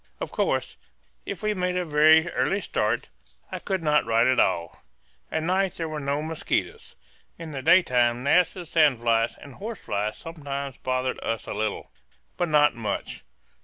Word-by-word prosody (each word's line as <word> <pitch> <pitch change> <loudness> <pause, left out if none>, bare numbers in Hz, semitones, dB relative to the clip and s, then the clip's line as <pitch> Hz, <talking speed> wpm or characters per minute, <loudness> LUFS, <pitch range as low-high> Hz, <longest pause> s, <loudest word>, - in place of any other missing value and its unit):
Of - - -5
course, - - -1 0.5
if - - -5
we 215 0 +1
made 180 -2 -1
a 180 -1 -1
very 155 +2 +5
early 195 - 0
start - - -1 0.4
I - - -4
could 190 -3 -3
not 150 -1 +3
write 115 +1 +2
at 130 0 +3
all. 85 -3 0 0.5
At 160 - -1
night 190 +2 +1
there 165 - -4
were 155 -1 -4
no 140 +1 -2
mosquitoes. 160 0 -3 0.4
In 165 -2 -8
the 135 -2 -5
daytime 125 -8 +3
gnats 175 +5 +3
and 180 -3 -8
sand 150 -7 +3
flies 115 0 +1
and 140 - -12
horse 220 +1 -6
flies 105 +1 -2
sometimes 140 -4 -6
bothered 130 0 -2
us 115 -2 -2
a - - -5
little, 105 0 -3 0.4
but 175 -1 -1
not 150 -1 +4
much. 110 -4 -4
150 Hz, 170 wpm, -25 LUFS, 120-170 Hz, 0.5 s, very